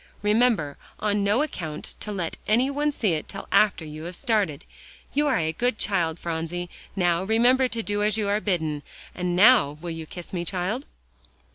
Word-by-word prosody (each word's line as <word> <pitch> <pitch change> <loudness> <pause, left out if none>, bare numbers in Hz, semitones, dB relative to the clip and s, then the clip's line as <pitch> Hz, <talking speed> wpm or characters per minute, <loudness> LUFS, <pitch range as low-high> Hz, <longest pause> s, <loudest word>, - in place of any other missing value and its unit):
Remember, 210 - +2 0.2
on 205 -1 +1
no 210 +8 +3
account 160 - -5
to 210 - -4
let 180 -5 -3
any 245 +6 +3
one 295 +1 +1
see 215 -10 0
it 155 - -3
till - - -7
after 200 -6 +3
you 155 +1 -8
have 175 +1 -6
started. 210 - 0 0.5
You 295 +1 +2
are 265 - +3
a 160 -1 0
good 240 +7 0
child, 175 -7 0
Phronsie. 170 +1 -4 0.2
Now, 175 -2 +2
remember 245 +5 +4
to 230 -2 -3
do 205 0 -1
as 210 +1 +2
you 210 -2 0
are 205 +1 +1
bidden. 160 -7 -1 0.3
And 180 -1 -2
now, 200 - +6
will 170 +1 -5
you 165 -1 -6
kiss 175 +3 -9
me, 175 -2 -1
child?" 190 - -2
195 Hz, 185 wpm, -25 LUFS, 165-225 Hz, 0.5 s, now